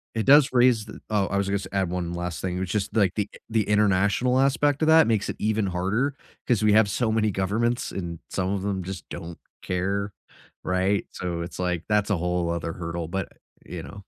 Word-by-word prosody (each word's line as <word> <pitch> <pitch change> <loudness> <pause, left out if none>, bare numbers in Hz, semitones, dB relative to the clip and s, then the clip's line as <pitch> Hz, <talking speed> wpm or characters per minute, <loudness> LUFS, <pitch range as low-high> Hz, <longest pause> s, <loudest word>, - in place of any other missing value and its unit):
it 110 - -1
does 145 +1 +7
raise 120 -3 +4
th - - -10
oh, 105 -3 +1
I 100 - -1
was 100 0 0
gonna 100 0 0
say - - -8
add 95 -3 0
one 85 -1 -3
last 85 -1 -4
thing, 90 0 -2
which 95 +1 -3
is 105 0 0
like, 100 -5 +3
the 105 -1 -1 0.2
the 110 -2 +1
international 105 +5 +3
aspect 140 +2 +2
of 155 - +2
that 160 -4 +6
makes 110 -2 +1
it - - -3
even 110 -1 0
harder 100 +10 -1 0.3
because 115 -4 +1
we 105 -1 +5
have 110 -2 +5
so 110 +2 0
many 110 -1 +1
governments, 110 +6 -1
and 85 -3 -5
some 95 0 -1
of 100 -2 -1
them 95 -2 -2
just 95 -4 -7
don't 85 -1 -7 0.2
care, 100 +2 -2 0.5
right, 95 +2 +1
so, 85 -2 -4
it's 85 - -7
like 90 -2 -1
that's 105 0 +2
a 100 - +2
whole 90 0 -1
other 85 -1 -2
hurdle, 85 -1 -4
but 95 +1 -3 0.4
you 85 -2 -7
know? 100 - -10
100 Hz, 215 wpm, -25 LUFS, 90-110 Hz, 0.5 s, does